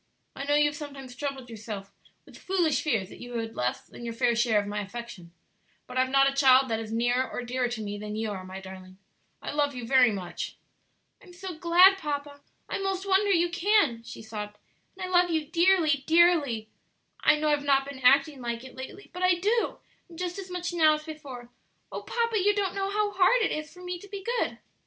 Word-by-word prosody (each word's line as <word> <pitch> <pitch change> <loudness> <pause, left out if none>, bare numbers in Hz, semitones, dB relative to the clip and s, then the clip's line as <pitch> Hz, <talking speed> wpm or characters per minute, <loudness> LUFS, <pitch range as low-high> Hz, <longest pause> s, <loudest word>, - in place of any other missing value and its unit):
I 275 - -5
know 290 +1 +2
you 295 0 +5
have 295 0 0
sometimes 275 -4 -9
troubled 270 -1 -5
yourself 215 -3 -7 0.3
with - - -16
foolish 350 -5 0
fears 225 - -1
that - - -12
you 245 0 -8
had 225 -1 -4
less 125 0 -2
than - - -12
your 230 -1 -5
fair 235 0 +2
share 230 -2 +3
of 205 - -3
my 205 +1 -3
affection; 200 -4 -8 0.5
but 250 - -10
I - - +2
have 260 0 +2
not 275 +1 +5
a 275 - +1
child 265 -2 +5
that 225 - 0
is 220 -1 -6
nearer 245 +3 +1
or 245 - -5
dearer 250 +1 -1
to 240 -2 -5
me 205 0 -5
than 210 0 -5
you 220 0 -2
are, 190 -2 -6
my 185 +1 -8
darling. 185 -1 -11 0.5
I - - -4
love 290 -1 0
you 245 -2 -5
very 250 -1 +5
much." 185 -4 -5 0.7
"I'm 365 -3 -16
so 370 +1 -7
glad, 360 +4 +6
papa; 285 -3 -4 0.3
I - - -3
'most 385 0 -2
wonder 390 +1 +3
you 345 -2 +3
can," 350 - +2
she 230 -1 -10
sobbed; 210 -1 -7 0.4
"and 380 - -6
I - - -2
love 355 -1 +3
you 320 -2 0
dearly, 330 -3 +3
dearly; 320 -10 +3 0.5
I - - +5
know 305 0 0
I've 295 -1 +1
not 275 -1 +3
been 280 -2 -8
acting 275 +2 +4
like 235 0 -4
it 260 - -11
lately, 265 +10 -10
but 360 - -6
I 365 -1 +4
do, 425 +6 0 0.3
and 335 - -13
just 360 +1 -4
as 380 -1 -8
much 355 -1 -4
now 315 -3 +5
as 305 - -7
before. 285 -6 -9 0.4
Oh, - - -5
papa, 465 -2 0
you 410 +2 +3
don't 390 -3 0
know 390 0 -2
how 415 0 0
hard 405 +5 +4
it - - +1
is 305 0 -4
for 360 - -14
me 360 -1 -4
to 405 - -13
be 400 -1 -7 0.2
good!" - - -1
285 Hz, 225 wpm, -27 LUFS, 235-355 Hz, 0.7 s, glad